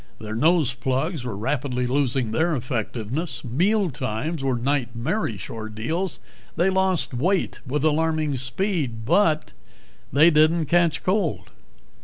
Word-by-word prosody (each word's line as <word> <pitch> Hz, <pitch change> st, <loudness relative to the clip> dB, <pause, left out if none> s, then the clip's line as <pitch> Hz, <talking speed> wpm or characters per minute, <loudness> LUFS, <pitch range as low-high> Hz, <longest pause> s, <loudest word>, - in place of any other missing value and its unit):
Their 110 Hz, 0 st, -6 dB
nose 155 Hz, +2 st, +3 dB
plugs 130 Hz, +5 st, -2 dB
were 115 Hz, -5 st, -4 dB
rapidly 125 Hz, +2 st, -1 dB
losing 130 Hz, -3 st, 0 dB
their 160 Hz, +8 st, +1 dB
effectiveness. 125 Hz, -, -3 dB
Mealtimes 155 Hz, -, 0 dB
were 130 Hz, -2 st, +1 dB
nightmarish 120 Hz, -, -1 dB
ordeals; 115 Hz, -, -4 dB, 0.4 s
they 175 Hz, +4 st, +2 dB
lost 190 Hz, -6 st, +1 dB
weight 180 Hz, +10 st, 0 dB
with 145 Hz, +3 st, -1 dB
alarming 155 Hz, -1 st, +1 dB
speed. 130 Hz, -, -2 dB
But 155 Hz, -, +2 dB, 0.6 s
they 155 Hz, +6 st, +6 dB
didn't 155 Hz, +1 st, +4 dB
catch 170 Hz, 0 st, +2 dB
cold. 185 Hz, -4 st, -1 dB
145 Hz, 115 wpm, -24 LUFS, 120-170 Hz, 0.6 s, they